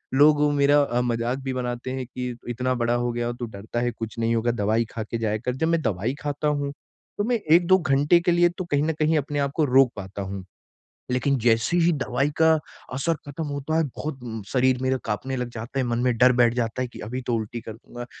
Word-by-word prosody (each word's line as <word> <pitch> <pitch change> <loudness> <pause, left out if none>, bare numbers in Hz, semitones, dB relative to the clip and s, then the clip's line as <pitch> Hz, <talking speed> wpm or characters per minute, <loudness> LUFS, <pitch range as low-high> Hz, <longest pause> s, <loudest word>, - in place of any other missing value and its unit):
लोग 145 +1 +6
मेरा 145 0 +4
अ, 125 -3 0
मज़ाक 120 +1 -1
भी 130 -1 -2
बनाते 125 0 -3
हैं, 130 0 -3
कि 125 0 -5
इतना 125 +2 -1
बड़ा 120 -1 +1
हो 120 0 0
गया, 120 0 -1
तू 120 0 -5
डरता 110 +2 -5
है 120 0 0
कुछ 115 0 -7
नहीं 115 0 +1
होगा, 115 +1 +1
दवाई 110 +1 +1
खा 115 - -4
के 115 +2 -4
जाया 110 -1 0
कर, 125 +3 -3
जब 160 +5 0
मैं 165 -1 +2
दवाई 110 +3 -1
खाता 145 0 -2
हूँ, 145 -1 0 0.5
तो - - +2
मैं 240 +1 +2
1-2 175 +3 +6
घंटे 145 +2 +3
के 175 - +2
लिए 175 0 +4
तो 185 - -3
कहीं 145 0 +2
न 160 +1 +1
कहीं 155 +1 +3
अपने 145 0 -2
आपको 140 +2 +1
रोक 130 -2 +5
पाता 100 0 -6
हूँ। 95 -1 -6 0.7
लेकिन 135 +2 +1
जैसे 115 +7 +2
ही 170 0 +4
दवाई 135 +3 0
का 160 0 +6 0.4
असर 150 +6 0
खत्म 145 +3 -5
होता 145 +2 -2
है, 165 - +3
बहुत 145 -3 -5
म 110 -2 -5
शरीर 130 -1 +3
मेरा 130 0 +1
काँपने 130 +5 -3
लग 125 -1 -2
जाता 115 +5 -5
है। - - 0
मन 120 -1 -1
में 125 -2 +2
डर 125 +1 +6
बैठ 120 -1 +3
जाता 120 +1 -1
है, 125 - -3
कि - - -12
अभी 125 +2 -4
तो 125 -1 -1
उल्टी 115 +1 -3
कर 110 - -8
दूँगा, 120 +1 -10
125 Hz, 235 wpm, -24 LUFS, 115-145 Hz, 0.7 s, लोग